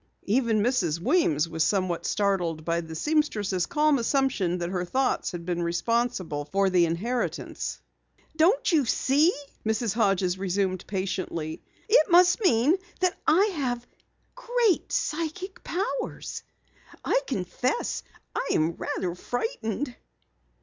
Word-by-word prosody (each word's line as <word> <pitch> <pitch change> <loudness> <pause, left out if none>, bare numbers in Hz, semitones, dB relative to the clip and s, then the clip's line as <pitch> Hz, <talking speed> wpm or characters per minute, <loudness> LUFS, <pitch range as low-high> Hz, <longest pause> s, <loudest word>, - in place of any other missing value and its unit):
Even 220 -1 +2
Mrs. 185 - +1
Weems 170 - +2
was 165 -1 0
somewhat 185 -2 0
startled 175 -6 0
by 170 0 0
the 160 -1 -8
seamstress' 210 - 0
calm 300 -2 +3
assumption 235 -8 +1
that 175 0 -3
her 180 -2 -1
thoughts 260 +8 0
had 175 -2 -7
been 175 -1 -1
responsible 175 -3 -1
for 195 +5 +1
the 175 -2 +4
inheritance. 225 +10 -3 0.6
"Don't 350 +10 +3
you 310 -4 +4
see," 285 +8 +3 0.3
Mrs. 220 -1 0
Hodges 195 -4 +1
resumed 190 -1 -1
patiently. 185 -5 -3 0.3
"It 420 -7 +5
must 360 +4 +5
mean 290 - +4 0.2
that 365 -1 +2
I 355 +6 +5
have 245 -6 -2 0.5
great 485 -5 +1
psychic 335 +5 -3
powers. 440 +7 -3 0.6
I - - +2
confess 250 - -1 0.3
I - - -1
am 160 +2 +1
rather 180 -2 -2
frightened." 245 - -3
220 Hz, 120 wpm, -26 LUFS, -, 0.6 s, It